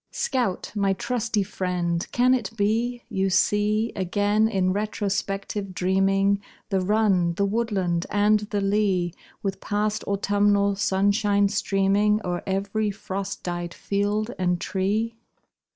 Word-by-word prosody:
Scout, 245 -9 -1
my 200 -2 +2
trusty 230 -1 -1
friend, 180 -3 -2
can 250 +1 +4
it 235 -6 0
be 230 +4 0
You 195 -4 0
see 210 +4 +2
Again, 205 +3 +1
in 190 -4 +1
retrospective 200 -1 -2
dreaming, 195 +2 +2 0.3
The 195 -2 +1
run, 190 -4 +2
the 200 - +1
woodland, 195 -5 -1
and 210 +1 +3
the 205 -1 -3
lea, 195 -4 +1 0.3
With 195 -1 -3
past 210 +1 -1
autumnal 200 0 +2
sunshine 200 +1 +2
streaming 200 +2 +2
O'er 175 -1 -2
ev'ry 200 +2 -1
frost 195 0 -5
dyed 175 -1 -4
field 205 +3 -1
and 180 -1 +1
tree? 210 +6 -1
200 Hz, 120 wpm, -25 LUFS, 190-210 Hz, 0.3 s, can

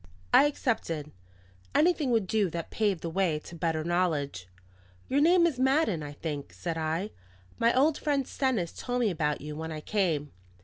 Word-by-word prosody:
I - - +8
accepted; 170 - -2 0.6
anything 315 -3 +3
would 225 -4 +2
do 205 0 +1
that 165 0 -5
paved 205 -6 0
the 165 - -3
way 175 -3 +1
to 150 - -10
better 160 -1 -1
knowledge. 155 - -1 0.6
"Your 280 +2 +2
name 340 +2 +5
is 300 -7 0
Madden, 265 - +2
I 145 -1 -6
think," 145 -2 -5
said 170 -2 -4
I. 165 +5 -2 0.5
"My 230 - +4
old 295 +3 +3
friend 280 -3 0
Stennis 235 -11 0
told 245 0 -2
me 220 -4 +2
about 150 -3 -1
you 150 +1 -6
when 160 +1 -5
I 155 - -4
came." 160 -6 -1
180 Hz, 175 wpm, -29 LUFS, 155-255 Hz, 0.6 s, I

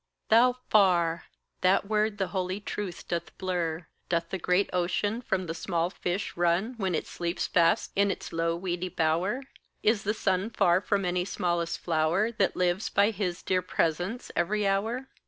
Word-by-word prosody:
Thou 245 +3 +6 0.2
far! 175 -5 +3 0.4
that 185 +2 +3
word 215 0 0
the 190 -2 -1
holy 185 +1 -2
truth 205 -3 -5
doth 170 -1 -4
blur. 175 -3 -2 0.2
Doth 170 -1 -1
the 190 - -2
great 180 +3 +2
ocean 205 +5 0
from 190 -6 -1
the 165 - -3
small 170 0 -1
fish 185 +1 -3
run 175 +7 +1
When 190 -5 0
it - - -2
sleeps 170 0 -3
fast 170 -1 +2
in 200 0 +3
its - - -4
low 165 0 0
weedy 180 0 -3
bower? 180 +9 0 0.4
Is 215 -1 +3
the 210 +2 -1
sun 190 0 0
far 180 -5 +3
from 200 0 0
any 180 0 0
smallest 175 -2 -1
flower, 170 +6 +1
That 205 -4 0
lives 180 +3 0
by 200 +2 +3
his 185 -4 -3
dear 185 -1 +1
presence 180 +6 -1
every 205 +4 +1
hour? 220 +7 0
185 Hz, 170 wpm, -28 LUFS, 170-205 Hz, 0.4 s, Thou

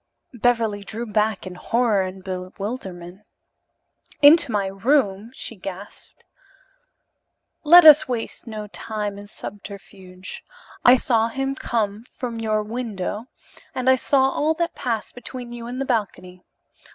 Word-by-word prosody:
Beverly 230 -4 +1
drew 225 +4 -5
back 215 -2 0
in 185 - -7
horror 225 +2 +1
and 185 0 -6
bewilderment. 185 0 -6 1.0
"Into 290 -2 +7
my 205 -2 0
room?" 200 +1 +1
she 235 - -7
gasped. 195 +1 -10 1.4
"Let 345 +2 +8
us 310 0 +9
waste 240 -1 -5
no 215 -2 -6
time 210 -1 -5
in 205 - -11
subterfuge. 195 -3 -10 0.4
I 245 - +8
saw 230 -3 +2
him 270 +3 -2
come 220 -5 -2
from 240 -2 -6
your 215 -1 0
window, 215 -2 -4 0.5
and 255 0 -3
I 260 - +7
saw 265 +1 +2
all 310 +3 0
that 340 +1 -2
passed 230 -5 -3
between 245 0 -8
you 235 -1 -7
in 245 +1 -6
the 270 - -2
balcony. 185 -7 -3
220 Hz, 130 wpm, -22 LUFS, 200-250 Hz, 1.4 s, us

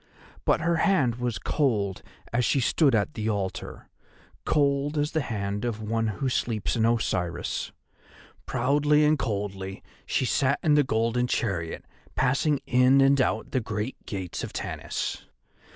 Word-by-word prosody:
But - - +3
her 170 +1 +1
hand 145 - +2
was 120 -2 -2
cold 105 - 0 0.3
as 120 +1 +2
she 135 - +2
stood 135 +1 +3
at 110 +7 0
the 110 0 -2
altar, 100 -3 -4 0.6
cold 145 0 +1
as 150 +1 0
the 160 - 0
hand 105 -4 -3
of 115 -3 -2
one 115 +1 -1
who 110 +6 -2
sleeps 115 -4 -1
in 115 -1 +2
Osiris. 90 -7 -1 0.8
Proudly 145 +4 +3
and 150 0 +3
coldly 100 -3 -4 0.2
she - - +1
sat 135 +3 +2
in 155 - +4
the 145 0 +5
golden 120 -1 0
chariot 95 -10 -2 0.3
passing 135 +3 +1
in 125 +2 +4
and 135 0 +5
out 110 -3 -1
the 130 - +1
great 110 +3 -4
gates 95 -4 -4
of - - -6
Tanis. - - -4
120 Hz, 150 wpm, -26 LUFS, 105-140 Hz, 0.8 s, the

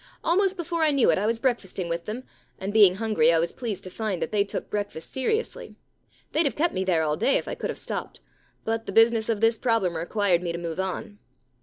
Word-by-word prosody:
Almost 380 +3 +2
before 340 -1 -2
I 315 - +4
knew 280 -4 +4
it - - +1
I 205 - 0
was 230 +1 +1
breakfasting 225 -7 -1
with 170 0 -3
them, 230 +5 -5 0.3
and 195 +2 -4
being 205 -4 +7
hungry 210 -7 +3
I 165 - +3
was 165 +1 0
pleased 215 -6 -5
to 185 - -7
find 210 -3 -3
that 160 - -3
they 205 -2 +3
took 200 - -5
breakfast 205 -6 -4
seriously. 440 - -2 0.6
They'd 315 -1 +2
have 250 - -3
kept 335 +3 +1
me 190 - -1
there 175 -4 +2
all 150 -1 0
day 270 +6 +3
if - - -5
I - - -3
could - - -4
have - - -4
stopped, - - -5 0.5
but 225 0 -2
the - - -3
business 225 0 +4
of 220 -2 0
this 225 -1 +3
problem 225 -8 +1
required 175 +2 +1
me 175 -1 -2
to - - -3
move 170 0 -5
on. 190 +2 -4
210 Hz, 235 wpm, -26 LUFS, 180-235 Hz, 0.6 s, being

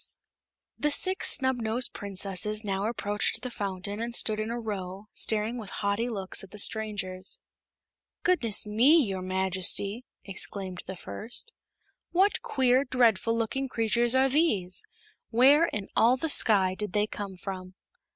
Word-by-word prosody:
The 295 - +1
Six 375 +6 +5
Snubnosed 245 -2 -1
Princesses 200 +2 -2
now 195 +1 -2
approached 215 0 -1
the 250 - -5
fountain 200 0 -4
and 235 0 -1
stood 215 -2 +2
in 215 +1 -3
a 235 +1 -4
row, 195 -3 -6
staring 220 +3 0
with 210 -4 -9
haughty 205 +4 -2
looks 195 -5 -3
at 195 - -12
the 210 - -12
strangers. 200 -3 -1 0.8
"Goodness 245 - +3
me, 235 +10 +4
your 195 -4 -4
Majesty!" 190 +4 +1 0.2
exclaimed 190 -1 -4
the 190 - -6
first; 200 - -5 0.6
"what 385 +4 +1
queer, 260 0 +2
dreadful 230 -4 +1
looking 270 +4 -2
creatures 235 +1 +1
are 265 +1 +4
these? 255 - +1 0.5
Where 275 +7 +5
in 205 -8 -5
all 240 +3 +4
the 320 +5 -3
Sky 195 -9 +5
did 210 0 -6
they 210 0 +2
come 205 -2 -7
from?" 185 0 -8
215 Hz, 140 wpm, -27 LUFS, 195-245 Hz, 0.8 s, Six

